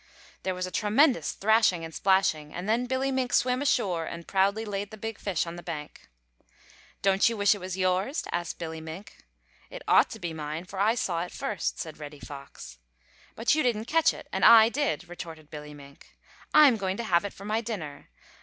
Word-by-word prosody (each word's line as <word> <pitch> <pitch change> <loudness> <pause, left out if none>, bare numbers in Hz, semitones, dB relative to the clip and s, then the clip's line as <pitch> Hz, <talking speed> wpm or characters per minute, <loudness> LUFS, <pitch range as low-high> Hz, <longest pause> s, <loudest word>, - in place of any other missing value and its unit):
There 185 -1 -2
was 185 0 -2
a 185 - -7
tremendous 240 +8 +2
thrashing 205 -5 +2
and 160 - -9
splashing, 175 -6 +1
and 180 +3 -5
then 235 +3 +1
Billy 260 +1 0
Mink 260 -2 -1
swam 250 +1 +2
ashore 195 - +1
and 170 +1 -8
proudly 200 +3 +1
laid 200 -1 -4
the 220 - -10
big 225 +1 -6
fish 185 -5 -1
on 170 0 -7
the - - -7
bank. 150 - -8 0.9
"Don't 195 +2 +4
you 230 - -4
wish 200 0 +4
it 205 - -7
was 185 0 -5
yours?" 185 - 0
asked 175 -1 -3
Billy 160 -1 -6
Mink. 160 +5 -9 0.5
"It - - -9
ought - - +5
to 225 - -8
be 170 -3 -4
mine, 155 +2 -5
for 190 +1 -8
I 215 +4 +3
saw 175 -8 -1
it 175 - -5
first," 255 -7 -3
said 160 -3 -7
Reddy 150 -1 -9
Fox. 140 - -10 0.6
"But 225 - +2
you 310 - +2
didn't 225 -4 0
catch 325 +4 +3
it - - -11
and - - -1
I 225 -1 +9
did," 275 -8 -1
retorted 165 -3 -9
Billy 150 -1 -8
Mink. 140 -1 -16 0.3
"I'm 290 -6 +7
going 190 -1 -2
to 235 - -3
have 175 -6 +2
it 205 - -4
for 195 - -11
my 215 +2 0
dinner. 175 - -6
195 Hz, 205 wpm, -27 LUFS, 165-225 Hz, 0.9 s, I